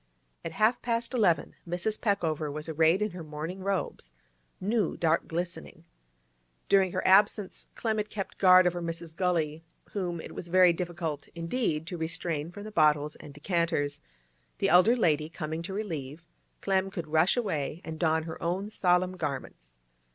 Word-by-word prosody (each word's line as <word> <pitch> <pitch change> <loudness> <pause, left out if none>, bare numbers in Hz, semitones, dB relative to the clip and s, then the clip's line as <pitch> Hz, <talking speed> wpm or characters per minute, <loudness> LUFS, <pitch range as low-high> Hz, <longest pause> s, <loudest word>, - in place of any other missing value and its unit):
At 165 - -5
half 215 +6 +2
past 235 +1 -1
eleven 200 -9 +2
Mrs. 180 +5 -2
Peckover 160 -8 0
was 150 +2 -5
arrayed 160 +5 +3
in 210 - -2
her 175 -2 -7
mourning 155 +4 -6
robes—new, 180 - -3
dark 165 -1 +1
glistening. 165 - -5 0.8
During 190 -2 +4
her - - -1
absence 200 0 +3
Clem 220 -2 -1
had 210 0 -2
kept 195 -2 -6
guard 185 -1 +7
over 175 0 0
Mrs. 165 -1 -5
Gully, 165 -4 0 0.3
whom 180 -4 -3
it - - -8
was 175 - -7
very 180 0 +6
difficult 170 -4 -4
indeed 165 -2 -1
to 175 0 -6
restrain 165 -1 -2
from 205 +3 -9
the 215 - -8
bottles 150 -4 +3
and 145 - -11
decanters; 145 -2 -1 0.6
the - - +1
elder 185 +7 +6
lady 155 -9 +1
coming 160 0 -4
to 170 - -6
relieve, 165 -7 -5 0.4
Clem 195 -1 +1
could 175 -4 -5
rush 160 +8 +3
away 165 - -2
and 160 -1 -7
don 160 -2 +2
her 160 0 -7
own 185 +5 -2
solemn 180 -1 +2
garments. 130 - -5
170 Hz, 160 wpm, -29 LUFS, 155-190 Hz, 0.8 s, guard